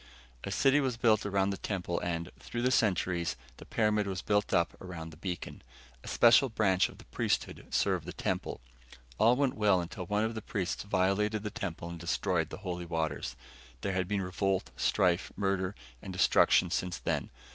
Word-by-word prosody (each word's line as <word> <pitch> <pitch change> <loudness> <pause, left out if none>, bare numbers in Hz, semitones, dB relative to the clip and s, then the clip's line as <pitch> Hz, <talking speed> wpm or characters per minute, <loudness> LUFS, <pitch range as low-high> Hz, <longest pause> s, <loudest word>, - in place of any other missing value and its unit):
A - - -4
city 135 +2 +4
was 130 -4 0
built 110 -3 +3
around 100 0 +1
the 100 - -3
temple 90 -4 -2
and, 85 0 -3
through 120 0 -4
the 125 - +3
centuries, 90 - +1 0.2
the - - -12
pyramid 105 -2 +1
was 95 -2 -3
put 105 0 +1
up 85 - +2
around 80 -3 -7
the - - -12
beacon. 90 +2 -5 0.4
A - - -11
special 120 +3 +6
branch 95 -4 +2
of - - -14
the - - -15
priesthood - - -2
served - - +1
the - - -4
temple. - - -3 0.6
All 115 +3 +6
went 135 -1 +1
well 105 -3 +3
until 90 +1 -5
one 105 +2 +1
of 110 +1 -1
the 110 - -5
priests 95 -3 -2
violated 100 +2 +1
the 105 - -3
temple 100 -7 -5
and 85 0 -7
destroyed 85 -1 0
the - - -7
holy 90 -1 -3
waters. 80 -3 -2 0.5
There 100 - -1
had 95 -1 0
been 100 0 0
revolt, 95 +1 -1
strife, 90 0 +2
murder 95 -1 -1 0.3
and 95 - -7
destruction 90 - +4
since 90 -1 -1
then. - - -2
95 Hz, 185 wpm, -31 LUFS, 90-105 Hz, 0.6 s, special